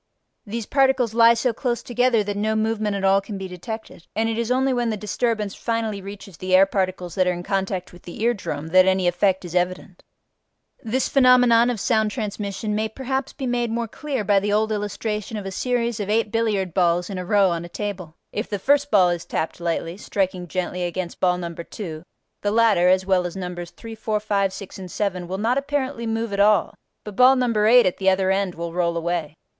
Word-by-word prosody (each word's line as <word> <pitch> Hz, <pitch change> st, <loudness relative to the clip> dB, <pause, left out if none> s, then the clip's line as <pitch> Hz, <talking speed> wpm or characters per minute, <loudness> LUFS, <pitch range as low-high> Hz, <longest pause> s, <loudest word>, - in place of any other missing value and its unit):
These 225 Hz, +1 st, -4 dB
particles 265 Hz, -4 st, +2 dB
lie 230 Hz, 0 st, +6 dB
so 235 Hz, +1 st, 0 dB
close 240 Hz, 0 st, -2 dB
together 245 Hz, -2 st, +2 dB
that 205 Hz, 0 st, -4 dB
no 215 Hz, +2 st, 0 dB
movement 215 Hz, -1 st, 0 dB
at 195 Hz, -, -3 dB
all 195 Hz, 0 st, +4 dB
can 200 Hz, 0 st, -7 dB
be 190 Hz, 0 st, -5 dB
detected, 185 Hz, 0 st, -8 dB
and 225 Hz, +1 st, +1 dB
it 225 Hz, -, -1 dB
is 235 Hz, 0 st, -1 dB
only 260 Hz, +1 st, +2 dB
when 240 Hz, -2 st, 0 dB
the 215 Hz, -, -2 dB
disturbance 210 Hz, 0 st, -1 dB
finally 225 Hz, -3 st, -2 dB
reaches 200 Hz, -2 st, -10 dB
the 185 Hz, +2 st, +1 dB
air 190 Hz, +1 st, +7 dB
particles 185 Hz, -2 st, -2 dB
that 185 Hz, -2 st, +1 dB
are -, -, +3 dB
in 175 Hz, 0 st, -6 dB
contact 190 Hz, -1 st, -2 dB
with 175 Hz, -, -14 dB
the 175 Hz, -, -10 dB
ear 240 Hz, +1 st, +3 dB
drum 155 Hz, -7 st, -5 dB
that 185 Hz, +2 st, +5 dB
any 190 Hz, -1 st, +2 dB
effect 185 Hz, +1 st, +1 dB
is 175 Hz, -, -8 dB
evident. 180 Hz, 0 st, -2 dB, 0.8 s
This 250 Hz, +4 st, -1 dB
phenomenon 250 Hz, -3 st, +5 dB
of 240 Hz, -3 st, -2 dB
sound 220 Hz, 0 st, +2 dB
transmission 210 Hz, -1 st, -4 dB
may 215 Hz, +1 st, -1 dB
perhaps 265 Hz, +3 st, -3 dB
be 270 Hz, -, -6 dB
made 240 Hz, -1 st, 0 dB
more 230 Hz, +1 st, -2 dB
clear 270 Hz, 0 st, -4 dB
by 200 Hz, 0 st, +3 dB
the 205 Hz, +1 st, -2 dB
old 215 Hz, +1 st, +1 dB
illustration 210 Hz, +1 st, -3 dB
of 205 Hz, -, -6 dB
a 195 Hz, -, -4 dB
series 235 Hz, +2 st, -1 dB
of 205 Hz, -1 st, -3 dB
eight 215 Hz, 0 st, +1 dB
billiard 210 Hz, -6 st, 0 dB
balls 175 Hz, -1 st, +2 dB
in 195 Hz, -3 st, -5 dB
a -, -, -4 dB
row 195 Hz, 0 st, +3 dB
on 170 Hz, 0 st, -2 dB
a 175 Hz, -, -9 dB
table: 180 Hz, -5 st, -5 dB, 0.2 s
if 210 Hz, -, -3 dB
the 205 Hz, -, -2 dB
first 285 Hz, +7 st, +2 dB
ball 190 Hz, -6 st, +5 dB
is 175 Hz, -1 st, -3 dB
tapped 160 Hz, -, -3 dB
lightly, 170 Hz, 0 st, -2 dB
striking 190 Hz, -3 st, -2 dB
gently 180 Hz, +1 st, -3 dB
against 175 Hz, 0 st, -4 dB
ball 180 Hz, -1 st, +2 dB
number 170 Hz, -1 st, -6 dB
2, 165 Hz, -5 st, -7 dB, 0.4 s
the 205 Hz, -, 0 dB
latter 220 Hz, -5 st, +4 dB
(as 185 Hz, 0 st, +3 dB
well 185 Hz, -2 st, +2 dB
as 175 Hz, -, -9 dB
numbers 180 Hz, -2 st, -5 dB
3, 225 Hz, +5 st, -10 dB
4, 215 Hz, -1 st, -2 dB
5, 200 Hz, -2 st, 0 dB
6, 195 Hz, 0 st, -9 dB
and 185 Hz, -1 st, -8 dB
7) 185 Hz, -3 st, -2 dB
will 190 Hz, +2 st, -3 dB
not 235 Hz, +6 st, +1 dB
apparently 275 Hz, -4 st, -3 dB
move 225 Hz, -1 st, -2 dB
at 200 Hz, -, -2 dB
all, 205 Hz, 0 st, +4 dB, 0.3 s
but 210 Hz, -2 st, -8 dB
ball 255 Hz, +3 st, +6 dB
number 230 Hz, -5 st, +2 dB
8 245 Hz, +2 st, +7 dB
at 185 Hz, -, 0 dB
the 190 Hz, -1 st, +3 dB
other 190 Hz, 0 st, +2 dB
end 195 Hz, -2 st, 0 dB
will 170 Hz, 0 st, -5 dB
roll 170 Hz, -1 st, 0 dB
away. 165 Hz, -2 st, -2 dB
205 Hz, 220 wpm, -23 LUFS, 185-230 Hz, 0.8 s, air